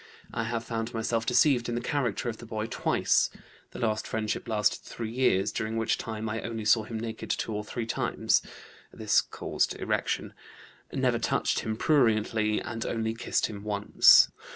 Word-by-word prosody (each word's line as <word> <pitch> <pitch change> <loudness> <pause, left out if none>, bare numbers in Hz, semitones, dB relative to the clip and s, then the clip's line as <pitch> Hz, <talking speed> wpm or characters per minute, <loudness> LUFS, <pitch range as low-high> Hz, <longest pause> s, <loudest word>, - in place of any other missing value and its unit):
I 115 - -2
have 115 0 -2
found 115 +1 -4
myself 115 0 -1
deceived 125 -1 +3
in 120 - -2
the - - 0
character 120 -3 -1
of 115 -2 -3
the 120 - -11
boy 110 -1 -3
twice. 115 - +1 0.4
The - - -11
last 110 -2 -1
friendship 110 -2 -2
lasted 105 -3 +1
three 115 -2 -6
years, 115 -6 +2
during 110 +1 -3
which 115 -1 0
time 110 -1 -4
I 110 +1 -3
only 115 -2 -5
saw 110 0 +4
him 110 0 -5
naked 115 0 -6
two 110 - -1
or 105 0 -3
three 115 +2 -4
times 115 - +1 0.5
(this - - +2
caused - - -2
erection), - - -1 0.6
never - - +1
touched - - 0
him 110 -1 -3
pruriently, 110 -6 +2
and 115 -1 -5
only 110 -1 -2
kissed 115 - 0
him 100 -2 -6
once. 105 -1 +6
115 Hz, 175 wpm, -28 LUFS, 110-115 Hz, 0.6 s, once